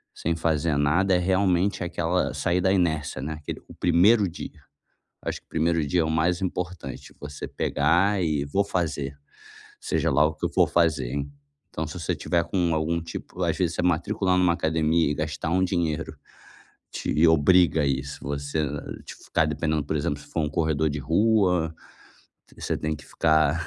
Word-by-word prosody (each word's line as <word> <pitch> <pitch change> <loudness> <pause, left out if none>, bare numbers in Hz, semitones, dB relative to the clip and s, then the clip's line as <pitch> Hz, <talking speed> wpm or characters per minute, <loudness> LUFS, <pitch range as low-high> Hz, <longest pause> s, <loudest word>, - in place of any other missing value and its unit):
sem 85 +1 -1
fazer 80 -2 0
nada 85 +7 +2
é - - +4
realmente 95 +1 +1
aquela 85 +1 -1
"sair 90 0 0
da 95 +1 +2
inércia", 80 -7 0
né, 75 +3 -3
aquele 75 -1 -7
"o - - -12
primeiro 100 +4 +4
dia". 85 - -9 0.6
Acho - - -4
que - - -45
o - - -56
primeiro 80 -1 +1
dia 85 +5 +1
é - - 0
o 80 - -1
mais 85 +3 +1
importante, 90 -6 -5
você 75 0 -7
pegar 90 +7 +1
e 75 -4 0
"vou 100 +8 +1
fazer, 80 -7 -2 0.6
seja - - 0
lá 75 - +4
o 80 - -2
que - - -6
eu - - -4
for - - +3
fazer", 80 -7 +1
en 70 0 -4 0.4
então 80 - -3
se 85 +4 -7
você 80 - -1
tiver 85 -1 0
com 85 -1 0
algum 80 +2 0
tipo 85 +2 -7
às 80 -2 0
vezes 85 -2 0
você - - -1
matricular 90 +2 +1
numa 90 -1 +4
academia 80 -1 +1
e - - 0
gastar 75 +1 -3
um 95 +2 +2
dinheiro 85 -3 -1 0.8
te 80 +3 +1
obriga 80 +1 +4
a - - +1
isso. 70 +1 -2
Você, 70 +2 -3
eh, 75 -1 -4
tipo, - - -11
ficar - - +1
dependendo, 75 -2 -1
por 75 - -2
exemplo, 70 0 -2
se 70 - -15
for 80 - -2
um 75 - 0
corredor 80 0 +1
de 75 - -3
rua, 90 - +2 0.8
você - - -2
tem 75 0 -2
que 75 - -14
ficar 80 +1 +2
80 Hz, 190 wpm, -25 LUFS, 75-90 Hz, 0.8 s, é